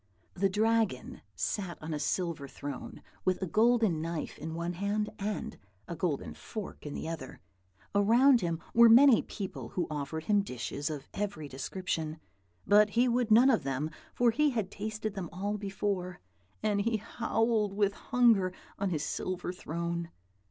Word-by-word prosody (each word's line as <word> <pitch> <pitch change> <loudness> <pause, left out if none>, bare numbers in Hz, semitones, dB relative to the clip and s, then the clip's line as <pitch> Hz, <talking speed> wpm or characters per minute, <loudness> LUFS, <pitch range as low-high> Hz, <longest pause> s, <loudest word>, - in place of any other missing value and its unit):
The 195 +2 +1
Dragon 215 - 0
sat 180 - -2
on 155 +1 -5
a 150 - -2
silver 165 -2 -1
throne, 145 +1 -7 0.2
with 185 -1 +1
a 190 - -1
golden 215 -2 +3
knife 165 -1 -4
in 160 +1 -5
one 170 +1 -2
hand, 205 +3 -1
and 205 +1 -3 0.3
a 170 - -5
golden 145 - -2
fork 190 - -7
in 145 - -5
the - - -4
other. 160 -6 -6 0.5
Around 235 +5 +5
him 170 -2 -1
were 235 0 +8
many 250 +1 +8
people, 195 -3 -6
who 175 - -1
offered 150 +2 -3
him 205 +3 +3
dishes 140 - -4
of 145 -3 -6
every 200 -7 -3
description; 155 +3 -4 0.5
but 210 +1 +6
he 240 +4 +3
would 240 -1 +1
none 240 +5 +7
of 225 - +2
them, 135 +3 -2 0.2
for 240 -1 +4
he 300 +5 +3
had 220 -7 -2
tasted 215 0 -4
them 190 -5 -5
all 200 +4 -2
before; 195 -2 -2 0.4
and 205 -1 +2
he 225 +1 +1
howled 225 -1 0
with 200 -1 +2
hunger 230 -7 +3 0.3
on 200 -1 0
his 155 -4 -1
silver 180 -1 -3
throne. 170 0 -4
195 Hz, 160 wpm, -31 LUFS, 165-220 Hz, 0.5 s, were